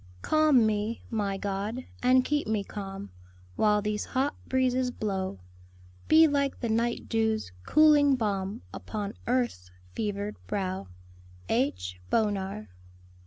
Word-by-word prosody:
"Calm 305 Hz, -7 st, +4 dB
me, 215 Hz, +1 st, -1 dB
my 205 Hz, -3 st, -1 dB
God, 205 Hz, +5 st, -3 dB, 0.2 s
and 255 Hz, +1 st, +4 dB
keep 295 Hz, -4 st, 0 dB
me 215 Hz, -2 st, 0 dB
calm 195 Hz, -, -7 dB, 0.4 s
While 210 Hz, -1 st, +3 dB
these 210 Hz, 0 st, -1 dB
hot 270 Hz, +2 st, 0 dB, 0.2 s
breezes 255 Hz, -1 st, +2 dB
blow; 195 Hz, -, -3 dB, 0.7 s
Be 320 Hz, +1 st, +7 dB
like 280 Hz, -2 st, 0 dB
the 235 Hz, -, -2 dB
night 235 Hz, +2 st, 0 dB
dew's 220 Hz, -, 0 dB, 0.2 s
cooling 295 Hz, -3 st, +6 dB
balm 205 Hz, -2 st, -2 dB
Upon 210 Hz, -1 st, -5 dB
earth's 240 Hz, -, 0 dB, 0.2 s
fevered 205 Hz, -1 st, -3 dB
brow." 190 Hz, -, -2 dB, 0.6 s
H. 90 Hz, -9 st, -1 dB
BONAR. 195 Hz, -, -1 dB
215 Hz, 120 wpm, -28 LUFS, 195-255 Hz, 0.7 s, Be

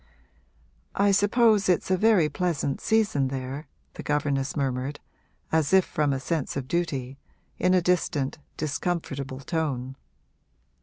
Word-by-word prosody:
'I 200 Hz, 0 st, +3 dB
suppose 205 Hz, 0 st, +4 dB
it's 180 Hz, +1 st, +1 dB
a -, -, +5 dB
very 195 Hz, -4 st, +4 dB
pleasant 155 Hz, -5 st, -1 dB
season 210 Hz, -12 st, +2 dB
there,' 135 Hz, +3 st, -5 dB, 0.3 s
the -, -, -7 dB
governess 145 Hz, -2 st, -1 dB
murmured, 135 Hz, 0 st, -2 dB, 0.5 s
as 160 Hz, 0 st, +1 dB
if 190 Hz, -1 st, +6 dB
from 150 Hz, -2 st, 0 dB
a 135 Hz, -, -1 dB
sense 150 Hz, 0 st, -2 dB
of 130 Hz, -2 st, -4 dB
duty, 140 Hz, -5 st, -2 dB, 0.4 s
in 185 Hz, 0 st, +3 dB
a 180 Hz, -, +3 dB
distant, 160 Hz, -6 st, 0 dB, 0.2 s
discomfortable 140 Hz, -3 st, -3 dB
tone. 135 Hz, -5 st, -2 dB
150 Hz, 130 wpm, -26 LUFS, 135-180 Hz, 0.5 s, if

